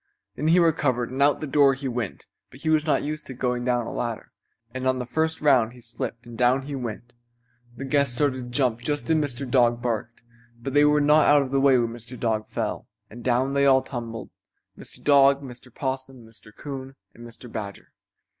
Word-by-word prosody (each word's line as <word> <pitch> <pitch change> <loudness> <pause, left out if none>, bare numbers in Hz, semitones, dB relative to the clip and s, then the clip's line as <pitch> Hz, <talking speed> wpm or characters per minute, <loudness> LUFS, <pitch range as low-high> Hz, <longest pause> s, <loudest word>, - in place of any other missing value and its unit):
Then 150 - -2
he 165 +3 +5
recovered 140 -8 +2
and 135 +2 -3
out 145 +1 +5
of - - -16
the - - -2
door 140 -1 +4
he 135 +1 -5
went; 120 -5 -4 0.2
but 130 - -15
he 160 - 0
was 155 0 +2
not 150 - +2
used 150 +1 -5
to 130 - -7
going 125 -1 -1
down 120 -1 0
a - - -6
ladder, 115 -2 -4 0.4
and 130 0 -3
on 130 0 +2
the 125 - -4
first 160 +5 -1
round 130 -6 +3
he 125 - -14
slipped 115 0 -6
and 120 -1 -10
down 125 +3 +2
he 145 +1 -7
went. 120 -2 -6 0.6
The 135 - -5
guests 140 -2 +1
started 140 -1 +1
to 125 -1 -7
jump 125 -2 0
just 145 +5 -2
as - - +4
Mr. 140 -3 -2
Dog 120 -2 +3
barked, 120 -1 -4 0.4
but 130 +3 -5
they 145 0 +5
were 150 0 +4
not 150 +1 +5
out 145 -1 +5
of 130 - -7
the 135 0 +2
way 135 -2 +5
when 120 -1 +1
Mr. 120 +1 -9
Dog 110 -2 -1
fell, - - -4 0.2
and 120 +2 -10
down 130 +2 +1
they 140 0 +3
all 130 -1 +5
tumbled, 115 -3 -7 0.4
Mr. - - -11
Dog, 140 -1 +5
Mr. 125 -1 -11
Possum, 130 -1 -5
Mr. 110 -1 -17
Coon 135 +2 -8 0.2
and 120 - -13
Mr. 120 +1 -10
Badger. 100 -3 -7
130 Hz, 220 wpm, -25 LUFS, 120-140 Hz, 0.6 s, he